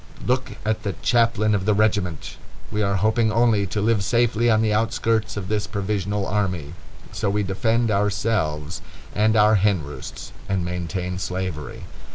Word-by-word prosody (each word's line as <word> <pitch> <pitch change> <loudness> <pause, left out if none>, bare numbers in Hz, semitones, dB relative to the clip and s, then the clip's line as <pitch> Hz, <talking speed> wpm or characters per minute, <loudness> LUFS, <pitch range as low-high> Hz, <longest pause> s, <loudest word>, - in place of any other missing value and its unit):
Look 130 -1 0
at 110 0 0
the 100 - -3
chaplain 115 -3 +3
of 95 -2 0
the 105 0 +3
regiment! 100 -6 0 0.3
We 105 - -1
are 100 -1 +1
hoping 110 +3 +2
only 110 -3 +3
to 105 - -2
live 105 -1 +2
safely 120 +1 +2
on 110 -1 +3
the 110 -1 +2
outskirts 110 0 0
of 95 -2 -4
this 105 0 -1
provisional 100 0 -2
army. 90 -7 -2 0.4
So 100 - -1
we 105 +1 0
defend 110 +4 +1
ourselves 100 -5 -1 0.3
and 110 +1 +2
our 105 0 +5
hen 100 -6 +2
roosts, 70 -2 -8 0.2
and 95 -3 0
maintain 90 +1 -3
slavery. 90 -5 -4
105 Hz, 160 wpm, -23 LUFS, 95-110 Hz, 0.4 s, our